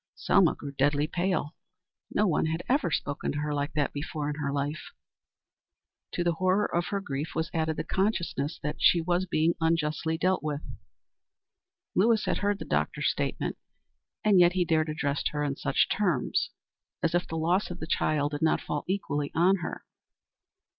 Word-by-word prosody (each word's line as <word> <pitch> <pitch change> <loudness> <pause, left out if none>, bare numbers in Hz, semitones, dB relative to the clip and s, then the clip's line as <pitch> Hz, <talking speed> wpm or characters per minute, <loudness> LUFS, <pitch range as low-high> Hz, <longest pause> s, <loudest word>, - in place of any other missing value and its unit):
Selma 185 -5 +3
grew 140 - -7
deadly 145 +2 +2
pale. 175 -1 -1 0.6
No 210 - +2
one 165 -4 +2
had 160 +2 -2
ever 270 - +2
spoken 145 -2 -2
to - - -3
her 150 0 -1
like 145 +1 -2
that 145 -2 0
before 150 0 -3
in - - -4
her 145 -2 -2
life. 145 +2 -3 1.2
To 175 - 0
the 175 - +2
horror 185 +4 +2
of 175 +1 +1
her 200 - -1
grief 145 -3 -4
was 160 0 -1
added 160 -1 0
the - - -1
consciousness 170 -7 -1
that 150 +1 -2
she 175 - +5
was 175 +2 0
being 160 0 +2
unjustly 160 0 +1
dealt 185 +2 +1
with. 150 -1 -3 1.3
Lewis 220 +3 +3
had - - 0
heard 205 0 +1
the - - -7
doctor's 75 0 0
statement, - - -3 0.7
and 205 -3 +6
yet 175 0 +6
he 180 -1 +1
dared 160 -1 +2
address 145 -2 -1
her 150 0 -2
in 140 -2 -1
such - - +1
terms. 180 -11 0 0.5
As 165 - +2
if 175 0 +1
the 165 - -4
loss 175 +5 +1
of 175 0 -7
the - - -4
child 150 -2 +1
did 145 - -4
not 160 - +3
fall 150 - -3
equally 150 -7 -1
on 185 +4 +4
her. 170 - -6
160 Hz, 180 wpm, -28 LUFS, 150-180 Hz, 1.3 s, and